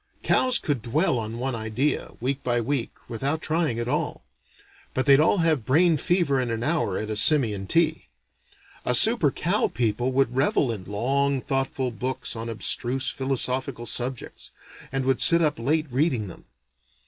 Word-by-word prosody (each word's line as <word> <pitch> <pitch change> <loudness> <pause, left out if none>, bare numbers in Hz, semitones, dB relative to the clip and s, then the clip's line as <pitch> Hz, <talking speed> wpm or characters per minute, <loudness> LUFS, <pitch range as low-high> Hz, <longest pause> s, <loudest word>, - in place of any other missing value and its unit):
Cows 255 -1 +3
could 140 -6 -2
dwell 140 - 0
on 110 +1 -5
one 130 +2 -3
idea, 115 +6 -2
week 135 +3 -2
by 120 -1 0
week, 120 +1 -2 0.2
without 135 +6 -2
trying 160 -7 -1
at 120 0 -3
all; - - -2 0.7
but 130 - 0
they'd 140 0 +6
all 160 +6 +3
have 155 -7 +1
brain 160 +8 +3
fever 150 -3 +1
in 125 - -3
an 115 0 -3
hour 145 - 0
at 110 0 -4
a - - -2
simian 105 -7 +3
tea. 160 - +1 0.8
A - - +1
super - - +6
cow - - 0
people 120 +2 -1
would 130 -2 0
revel 135 -1 +1
in 100 -5 -6
long 135 +7 0
thoughtful 135 -1 -2
books 125 +2 -4
on 115 +1 -5
abstruse 125 +3 -1
philosophical 130 -2 -1
subjects, 125 +1 -4 0.4
and 135 -1 -2
would 135 -1 +1
sit 170 -1 +5
up 150 -6 0
late 155 +6 0
reading 130 -5 0
them. 90 - -11
130 Hz, 165 wpm, -24 LUFS, 115-145 Hz, 0.8 s, they'd